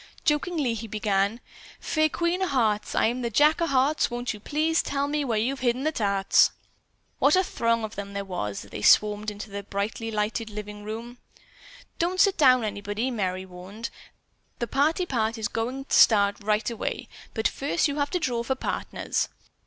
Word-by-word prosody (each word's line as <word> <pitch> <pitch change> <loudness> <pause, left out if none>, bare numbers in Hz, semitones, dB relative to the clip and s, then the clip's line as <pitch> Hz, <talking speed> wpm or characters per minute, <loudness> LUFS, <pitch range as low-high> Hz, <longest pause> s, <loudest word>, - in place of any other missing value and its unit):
Jokingly 300 -4 +1
he 225 0 -5
began: 205 +1 0 0.4
"Fair 310 0 +1
Queen 340 +3 -1
o' 375 - +1
Hearts, 220 -7 0
I'm 245 +3 +1
the 235 - -1
Jack 300 +8 +4
o' 335 - +2
Hearts, 275 +2 +2
won't 240 0 -3
you 210 - -10
please 310 +8 +1
tell 280 0 -1
me 295 0 -1
where 235 -5 0
you've 260 +5 0
hidden 250 +1 0
the 310 - +1
tarts?" 200 -7 +3 0.7
What 290 - +5
a 375 - +4
throng 230 -8 0
of 220 0 -5
them 200 0 -6
there 200 0 -3
was 105 - -4
as 100 - -18
they 105 - -6
swarmed 210 - +4
into 205 0 -8
the 200 0 -4
brightly 205 +3 -3
lighted 220 +1 -2
living 210 0 -7
room. 230 +3 -7 0.8
"Don't 360 +2 0
sit 395 0 +5
down, 255 -5 +5
anybody," 205 +4 -2
Merry 185 -5 -2
warned. 190 +5 -8 0.7
"The 235 - -1
party 305 - +1
part 230 -6 -1
is 220 - -1
going 255 +4 -3
to - - -6
start 200 -2 +5
right 210 +1 0
away. 235 -2 -3 0.3
But 220 -1 +2
first 290 +4 0
you 285 0 -3
have 285 0 0
to 360 - -1
draw 245 -6 -1
for 265 +3 -1
partners." - - -2
230 Hz, 185 wpm, -26 LUFS, 210-280 Hz, 0.8 s, What